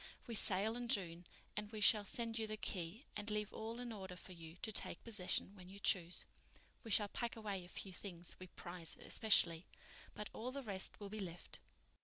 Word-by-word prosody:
We 235 Hz, -, -4 dB
sail 210 Hz, +1 st, +3 dB
in 245 Hz, 0 st, -2 dB
June 175 Hz, -7 st, +1 dB, 0.3 s
and 210 Hz, 0 st, -2 dB
we 215 Hz, -, -4 dB
shall 210 Hz, 0 st, +7 dB
send 230 Hz, +2 st, 0 dB
you 220 Hz, -, +1 dB
the 215 Hz, 0 st, -2 dB
key, 195 Hz, -, -2 dB
and 210 Hz, +1 st, -2 dB
leave 210 Hz, -1 st, 0 dB
all 225 Hz, +1 st, -4 dB
in 245 Hz, -2 st, -3 dB
order 190 Hz, -3 st, -6 dB
for 185 Hz, -, -7 dB
you 165 Hz, -2 st, -9 dB
to 220 Hz, -, -1 dB
take -, -, -1 dB
possession 205 Hz, -2 st, +1 dB
when 180 Hz, -2 st, -11 dB
you 195 Hz, -, -9 dB
choose. 180 Hz, -3 st, +3 dB, 0.6 s
We 230 Hz, -, -7 dB
shall 205 Hz, 0 st, +6 dB
pack 235 Hz, +3 st, -2 dB
away 205 Hz, -4 st, -2 dB
a 175 Hz, -, -11 dB
few 190 Hz, +1 st, -4 dB
things 175 Hz, -2 st, -4 dB
we 185 Hz, -, -7 dB
prize 175 Hz, -1 st, -2 dB
especially, 175 Hz, -6 st, +4 dB, 0.5 s
but 210 Hz, -, -5 dB
all 245 Hz, +3 st, -3 dB
the 280 Hz, +1 st, -4 dB
rest 195 Hz, -4 st, 0 dB
will 205 Hz, -1 st, -5 dB
be 215 Hz, +1 st, -3 dB
left." 175 Hz, -3 st, -4 dB
205 Hz, 205 wpm, -41 LUFS, 180-220 Hz, 0.6 s, shall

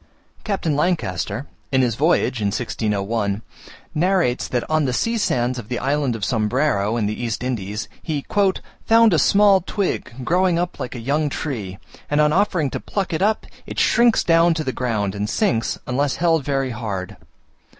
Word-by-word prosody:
Captain 190 Hz, -8 st, -1 dB
Lancaster, 120 Hz, -, -1 dB, 0.3 s
in 130 Hz, -1 st, +3 dB
his 120 Hz, -2 st, +1 dB
voyage 140 Hz, -3 st, +1 dB
in 100 Hz, -, +1 dB
1601, 105 Hz, -1 st, -1 dB, 0.5 s
narrates 175 Hz, -6 st, +1 dB
that 120 Hz, -1 st, -2 dB
on 155 Hz, -1 st, +1 dB
the 130 Hz, -, 0 dB
sea 230 Hz, -, 0 dB
sands 125 Hz, -, 0 dB
of 110 Hz, -, -10 dB
the 125 Hz, -, -2 dB
Island 140 Hz, -2 st, 0 dB
of 105 Hz, -3 st, -3 dB
Sombrero, 110 Hz, -2 st, +1 dB
in 110 Hz, -, 0 dB
the 105 Hz, +3 st, -3 dB
East 115 Hz, 0 st, -2 dB
Indies, 105 Hz, -4 st, -3 dB
he 150 Hz, -4 st, -3 dB, 0.6 s
"found 225 Hz, -2 st, +6 dB
a 160 Hz, -, +4 dB
small 200 Hz, +3 st, +5 dB
twig 195 Hz, -3 st, -2 dB
growing 180 Hz, +3 st, +2 dB
up 175 Hz, +1 st, -2 dB
like 125 Hz, -, -5 dB
a -, -, -5 dB
young 145 Hz, +5 st, 0 dB
tree, 110 Hz, -11 st, -4 dB, 0.3 s
and 145 Hz, -, +1 dB
on 150 Hz, 0 st, +4 dB
offering 180 Hz, -7 st, +1 dB
to -, -, -3 dB
pluck 195 Hz, -3 st, -3 dB
it 160 Hz, -, -1 dB
up 215 Hz, +2 st, +1 dB, 0.2 s
it -, -, -7 dB
shrinks 235 Hz, -1 st, +4 dB
down 165 Hz, 0 st, +4 dB
to 160 Hz, -, -2 dB
the 130 Hz, -, -2 dB
ground, 110 Hz, -6 st, -1 dB
and 105 Hz, +1 st, -3 dB
sinks, 120 Hz, -, 0 dB
unless 135 Hz, +2 st, 0 dB
held 165 Hz, -3 st, +2 dB
very 135 Hz, -2 st, -1 dB
hard. 105 Hz, -6 st, -5 dB
135 Hz, 175 wpm, -21 LUFS, 115-170 Hz, 0.6 s, found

